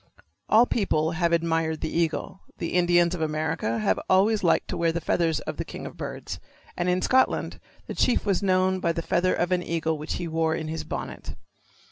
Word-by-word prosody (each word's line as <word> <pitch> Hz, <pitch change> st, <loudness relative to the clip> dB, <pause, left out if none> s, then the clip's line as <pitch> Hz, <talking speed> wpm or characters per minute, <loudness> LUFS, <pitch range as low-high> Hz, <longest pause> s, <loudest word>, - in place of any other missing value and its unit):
All 225 Hz, +3 st, +6 dB
people 160 Hz, -9 st, 0 dB
have 170 Hz, 0 st, 0 dB
admired 165 Hz, -1 st, 0 dB
the 160 Hz, -, -3 dB
eagle. 170 Hz, +3 st, -1 dB, 0.2 s
The 170 Hz, -, -4 dB
Indians 175 Hz, -1 st, +3 dB
of 175 Hz, -, -4 dB
America 155 Hz, -6 st, -1 dB
have 100 Hz, -4 st, +1 dB
always 200 Hz, +3 st, +3 dB
liked 170 Hz, -, +2 dB
to -, -, -3 dB
wear 165 Hz, -1 st, +2 dB
the 170 Hz, -, -2 dB
feathers 165 Hz, -1 st, 0 dB
of -, -, -6 dB
the -, -, -2 dB
king -, -, -8 dB
of -, -, -8 dB
birds, -, -, -6 dB, 0.4 s
and 175 Hz, +1 st, -1 dB
in 180 Hz, +1 st, +1 dB
Scotland 260 Hz, 0 st, +2 dB, 0.3 s
the -, -, -6 dB
chief 245 Hz, -, +1 dB
was 200 Hz, -2 st, +1 dB
known 185 Hz, -1 st, +2 dB
by 170 Hz, -2 st, 0 dB
the 170 Hz, -, -3 dB
feather 180 Hz, +3 st, +1 dB
of 175 Hz, +1 st, -1 dB
an 180 Hz, -1 st, +2 dB
eagle 160 Hz, -2 st, -1 dB
which 150 Hz, -, -4 dB
he 175 Hz, -, -3 dB
wore 160 Hz, 0 st, 0 dB
in 160 Hz, -1 st, -4 dB
his 160 Hz, 0 st, -4 dB
bonnet. -, -, -6 dB
170 Hz, 205 wpm, -26 LUFS, 160-185 Hz, 0.4 s, All